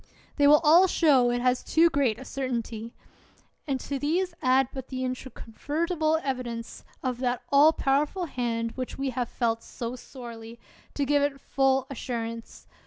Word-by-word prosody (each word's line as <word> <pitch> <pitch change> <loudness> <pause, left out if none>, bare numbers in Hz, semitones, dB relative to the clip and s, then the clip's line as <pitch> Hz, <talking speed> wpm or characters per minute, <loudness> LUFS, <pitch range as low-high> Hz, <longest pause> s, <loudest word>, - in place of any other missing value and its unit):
They 285 -1 +5
will 300 +2 +7
all 335 +5 +7
show 280 -9 +4
it 240 0 0
has 250 0 +1
too 330 +1 +4
great 265 -7 +1
a 265 - -10
certainty. 235 -4 -4 0.7
And 270 -2 -1
to 280 -1 -4
these 345 +5 0
add 260 0 +3
but 265 -1 -7
the 260 -1 -4
introconvertible 305 +6 -2
evidence 245 -4 -4 0.2
of 250 -2 -2
that 250 -1 -1
all 290 +3 +7
powerful 300 +5 0
hand 230 -5 -2
which 255 0 -6
we 270 -1 -2
have 245 -1 -3
felt 230 -2 -1
so 240 +1 -6
sorely, 235 -3 -10 0.4
to 285 - 0
give 290 +1 +2
it 285 -1 -1
full 270 -1 +1
assurance! 230 -3 -6
260 Hz, 160 wpm, -27 LUFS, 240-285 Hz, 0.7 s, will